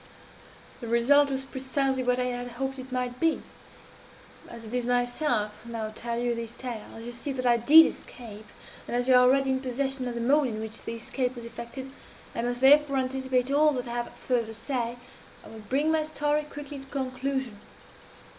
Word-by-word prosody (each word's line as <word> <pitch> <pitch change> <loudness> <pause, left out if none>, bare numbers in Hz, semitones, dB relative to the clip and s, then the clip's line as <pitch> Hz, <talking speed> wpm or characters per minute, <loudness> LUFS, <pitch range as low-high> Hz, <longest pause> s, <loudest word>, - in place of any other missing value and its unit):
"The 235 - -7
result 275 +5 +4
was 265 0 -2
precisely 265 0 -1
what 250 0 +1
I - - +2
had 245 0 -3
hoped 270 +2 -3
it 260 0 -9
might 250 -1 -2
be. 325 -1 +1 1.1
As 230 -1 -10
it 220 - -9
is 245 -1 -1
myself 245 -3 0
who 235 - -11
now 220 -2 -3
tell 235 +1 -4
you 240 0 0
this 230 0 -5
tale 240 -4 -6
as 225 - -9
you 240 - -6
see 240 +4 -4
that 255 -1 -4
I 240 -1 +5
did 300 +8 +8
escape 215 -3 -8 0.4
and - - -3
as 245 +1 0
you 260 - +5
are 250 - +8
already 265 +2 +4
in 260 0 0
possession 265 0 -2
of 240 - -4
the 235 - -3
mode 280 +4 +3
in 215 -3 -4
which 220 0 -6
this 230 0 -6
escape 255 0 -2
was 235 -1 -8
effected, 235 +3 -8 0.4
and 235 +1 -2
must 245 0 -2
therefore 280 +1 +6
anticipate 260 0 0
all 300 +1 +4
that 250 -2 -3
I - - -5
have 240 0 -3
farther 240 -3 -1
to 225 - -8
say 235 0 -3 0.5
I - - -11
will 225 - -10
bring 275 +8 0
my 320 -1 +2
story 300 -1 0
quickly 290 -1 -7
to 270 - -11
conclusion. 265 -4 -3
250 Hz, 205 wpm, -27 LUFS, 235-270 Hz, 1.1 s, did